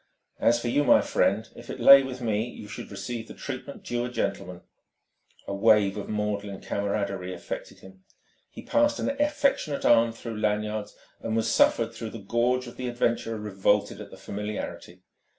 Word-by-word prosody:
As 120 0 +3
for 120 - -4
you, 145 +5 +2
my - - +6
friend, - - +1
if - - -12
it - - -6
lay 140 0 +9
with 130 -1 -6
me, 110 -2 0
you 105 - -10
should 105 - -8
receive 110 +4 -5
the - - -10
treatment 140 +1 -7
due 120 0 -2
a - - -4
gentleman." 90 -7 -3 0.8
A - - -4
wave 105 -1 +4
of 105 - -6
maudlin 105 -2 -2
camaraderie 100 -2 -2
affected 85 - -7
him. 95 0 -15 0.5
He - - -11
passed 290 0 +2
an - - -1
affectionate 275 - +1
arm 115 0 +5
through 115 -1 -7
Lanyard's 105 0 -1 0.2
and 110 - -3
was 115 -1 +1
suffered, 115 0 +3
though 115 -1 -6
the 115 - -8
gorge 120 +5 0
of 120 - -11
the 125 - -4
adventurer 120 -2 -1
revolted 105 0 0
at - - -9
the - - -12
familiarity. 100 -3 -6
110 Hz, 175 wpm, -27 LUFS, 100-120 Hz, 0.8 s, lay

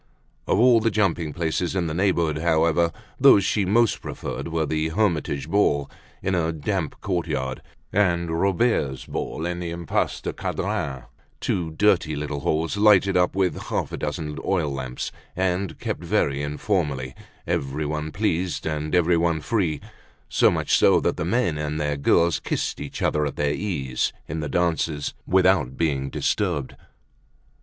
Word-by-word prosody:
Of - - +2
all 120 +1 +6
the 115 +1 +2
jumping 85 -7 0
places 85 +3 -1
of 90 -2 +1
the 80 - -2
neighborhood, 85 -4 +1
however, 85 +1 +2 0.3
those 100 - +7
she 100 -3 +1
most 115 +4 +2
preferred - - -5
were 80 -1 0
the 80 +1 0
"Hermitage 80 -7 0
Ball" 80 -6 +1 0.3
in 95 - 0
a 85 -2 +1
damp 80 +1 -3
courtyard 65 -1 -2 0.3
and 85 -4 +2
"Robert's 85 - +1
Ball" 80 - -4
in 90 0 -2
the 85 -1 -4
Impasse 85 0 -1
du - - -4
Cadran, 65 -2 -3 0.4
two 85 -3 -1
dirty 80 -2 +2
little 75 0 -3
halls, 80 +4 -1
lighted 100 -2 +5
up 90 0 +2
with 95 -2 +1
a - - -7
half - - -2
dozen 75 -2 -4
oil 80 -7 0
lamps, 65 -2 -4 0.2
and 95 0 -1
kept - - -4
very 80 -7 +1
informally, 75 -4 -1 0.3
everyone 75 +3 -2
pleased 90 -3 -1
and 75 0 -1
everyone 85 -1 +3
free, 85 - 0 0.5
so - - +4
much - - +1
so - - +5
that - - 0
the - - -3
men 90 -6 +1
and 75 +1 -2
their 75 -1 0
girls 85 +4 +3
kissed - - -2
each 70 - -5
other 75 - +2
at - - -6
their 75 0 0
ease, 75 -10 -1 0.2
in 80 +2 -4
the 75 - -3
dances, 80 -4 0
without 95 -8 +3
being 70 -4 0
disturbed. 85 -8 -1
80 Hz, 155 wpm, -24 LUFS, 75-95 Hz, 0.5 s, those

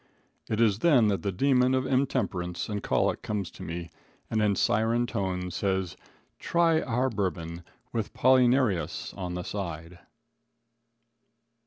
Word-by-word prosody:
It 110 - -1
is 110 -3 +3
then 125 -8 +4
that 100 - 0
the 100 - -1
demon 130 +4 +3
of 130 0 0
intemperance 110 -10 -1
and 105 -1 -3
colic - - 0
comes 100 -4 -3
to - - -13
me 85 0 -6 0.4
and, 110 - +1
in 105 -2 +2
siren 115 +5 +2
tones, 90 -5 -3
says: 95 -2 -1 0.4
"Try 165 -2 +2
our 125 +2 0
bourbon, 85 -5 -3 0.3
with 115 -3 -2
'Polly 130 0 +4
Narius' 100 - 0
on 90 -2 -4
the 90 - -4
side." 85 -3 -6
105 Hz, 140 wpm, -28 LUFS, 90-125 Hz, 0.4 s, then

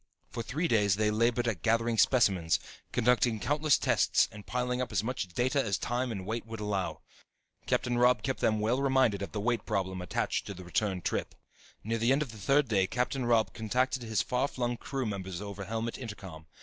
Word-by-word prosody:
For 120 - -4
three 150 +9 -1
days 105 - +3
they 105 +1 +1
labored 120 +2 +1
at 100 -8 -2
gathering 115 +1 +1
specimens, 95 -10 +3 0.3
conducting 120 -1 +2
countless 150 +4 +2
tests - - +3
and 105 -1 -12
piling 125 0 -1
up 125 - -3
as 105 -1 0
much 120 -4 -2
data 130 - 0
as 100 -4 0
time 125 +1 -2
and 95 -4 -5
weight 115 +3 -3
would 115 -1 -7
allow. 105 -3 -2 0.7
Captain 120 -1 +1
Robb 125 0 +4
kept 130 -4 -2
them 110 0 +2
well 115 +5 +1
reminded 130 -7 +2
of 100 - -4
the 105 - -3
weight 120 +2 0
problem 95 -1 -2
attached 90 - -2
to 100 - -6
the 90 - -9
return 90 +1 -1
trip. - - -2 0.5
Near 115 +2 -1
the 115 +3 +3
end 140 +3 +3
of 130 - -9
the 110 - -11
third 135 +7 +3
day 95 -4 +2
Captain 125 +3 -1
Robb 115 -2 +3
contacted 125 +4 0
his 110 -3 0
far 125 +2 0
flung 120 -3 -2
crew 135 +2 -4
members 95 -4 -4
over 100 -1 -6
helmet 115 +3 -3
intercom. 95 -9 -8
115 Hz, 200 wpm, -30 LUFS, 100-125 Hz, 0.7 s, Robb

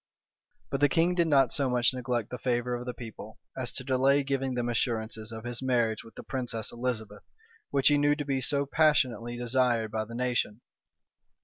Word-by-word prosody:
But 135 - -1
the 145 0 +4
king 170 +2 +3
did 170 -2 +2
not 135 -5 +4
so 140 -2 +1
much 125 0 +2
neglect 125 -3 -2
the 125 - -5
favor 125 0 0
of 120 +1 -4
the 125 - -2
people, 110 -2 -9 0.2
as 125 -1 -3
to 130 - -4
delay 135 +2 +3
giving 135 -1 -1
them 120 -1 -1
assurances 110 -2 -2
of 110 -1 -7
his 120 0 -3
marriage 120 -4 +1
with 115 - -15
the - - -8
princess 120 -5 -3
Elizabeth, 115 -4 -4 0.5
which 140 0 +4
he 145 0 +4
knew 145 0 +3
to 145 -1 -4
be 135 -2 0
so 140 +1 +2
passionately 130 -6 +2
desired 120 -2 +1
by 110 0 -2
the 115 +2 -9
nation. 120 -3 -1
125 Hz, 195 wpm, -29 LUFS, 115-135 Hz, 0.5 s, the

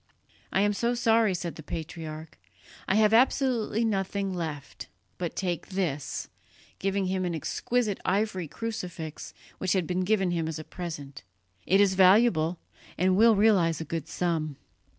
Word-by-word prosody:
"I 195 - +2
am 205 0 +3
so 235 +4 0
sorry," 225 -4 +3
said 170 -1 -5
the - - -7
patriarch, 160 0 -7 0.5
"I 190 - +2
have 215 0 +4
absolutely 235 -2 +2
nothing 195 -2 -1
left, 155 -5 -5 0.3
but 175 -2 -3
take 175 -3 -2
this," 170 -8 -3 0.5
giving 195 0 0
him 185 0 -1
an 175 -2 -1
exquisite 215 +6 -1
ivory 190 -3 0
crucifix 180 -6 -6 0.3
which 185 -1 +1
had 185 -3 +1
been 180 +2 -1
given 195 -2 +1
him 165 -2 -1
as 160 -1 -4
a 155 - -6
present; 150 -5 -7 0.5
"it 195 +3 +4
is 200 -2 +4
valuable, 185 -3 +4 0.4
and 185 +1 +3
will 225 +2 +6
realize 195 -6 +3
a 160 - -4
good 160 0 -4
sum." 160 -4 -1
185 Hz, 150 wpm, -28 LUFS, 165-205 Hz, 0.5 s, will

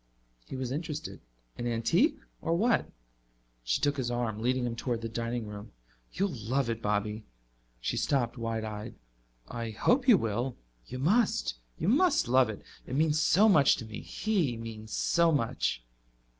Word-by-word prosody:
He - - -6
was 130 -1 -3
interested. 155 +1 -4 0.4
"An 120 - -2
antique? 115 -1 +2 0.2
Or 165 - +1
what?" 230 +6 +2 0.7
She - - +1
took 145 0 +1
his 125 -3 -1
arm, 120 -3 -2
leading 125 +2 +1
him 120 -1 -2
toward 120 -1 -2
the 115 - -3
dining 115 +1 -3
room. 105 -1 -9 0.4
"You'll 195 -2 -1
love 120 +2 -1
it, 115 0 -4
Bobby." 105 +1 -1 0.6
She - - -2
stopped, 125 -4 +1
wide 115 -2 -3
eyed. 105 0 -6 0.5
"I 115 - -4
hope 245 - +2
you 235 -6 +8
will. 120 - -2 0.3
You 130 - -6
must; 155 - +2 0.2
you - - -2
must 305 - +4
love 130 -1 +4
it. 110 - -7 0.2
It 130 - -4
means 155 +1 +2
so 190 +6 +5
much 165 -10 +6
to 115 - -7
me 110 -1 -7
he 180 - -1
means 110 -1 -8
so 170 -1 +3
much." 115 - 0
120 Hz, 165 wpm, -30 LUFS, 110-155 Hz, 0.7 s, you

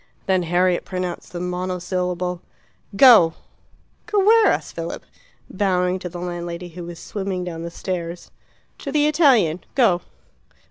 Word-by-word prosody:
Then 190 -2 +2
Harriet 175 +1 +1
pronounced 180 -2 -5
the 175 - -5
monosyllable 180 0 -3 0.5
"Go!" 215 -9 +7 0.7
"Go 415 -3 +1
where?" 450 +1 +6
asked - - 0
Philip, - - -6 0.4
bowing 185 -2 0
to 180 - -6
the 175 - -8
landlady, 175 0 -5
who 175 +1 -9
was 170 -1 -8
swimming 190 0 -4
down 170 -2 -6
the 170 - -5
stairs. 170 -1 -5 0.5
"To 280 - -5
the 295 0 +2
Italian. 265 - +3
Go." 210 -10 +3
180 Hz, 135 wpm, -22 LUFS, 175-195 Hz, 0.7 s, Go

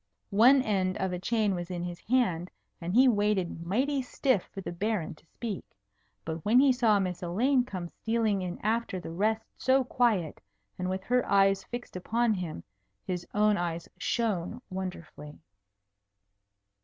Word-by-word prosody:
One 250 +6 +6
end 190 -4 0
of 190 -1 -1
a 180 - -3
chain 215 +1 +1
was 175 -1 -4
in 175 -1 -3
his 175 0 -5
hand, 185 -9 +1 0.3
and 175 +4 -3
he 260 +2 +7
waited 205 -7 +1
mighty 260 +11 0
stiff 255 -5 0
for - - -7
the 190 - -5
Baron 195 -1 -2
to 155 +1 -23
speak. 220 0 -5 0.6
But 160 -1 -4
when 230 +4 +5
he 270 -1 +6
saw 225 -5 +3
Miss 180 -3 -2
Elaine 245 +10 +2
come 185 -7 -5
stealing 220 0 0
in 180 -1 -4
after 220 -3 0
the 170 - -7
rest 215 +5 0
so 265 0 +3
quiet 230 - 0 0.4
and 180 0 -1
with 190 0 -3
her 250 +3 +2
eyes 195 -1 +4
fixed 240 -3 -7
upon 225 +5 +1
him, 175 - -5 0.4
his 180 -1 -4
own 210 0 +4
eyes 170 -1 -3
shone 220 -2 -1
wonderfully. 175 -5 -7
200 Hz, 160 wpm, -29 LUFS, 180-235 Hz, 0.6 s, he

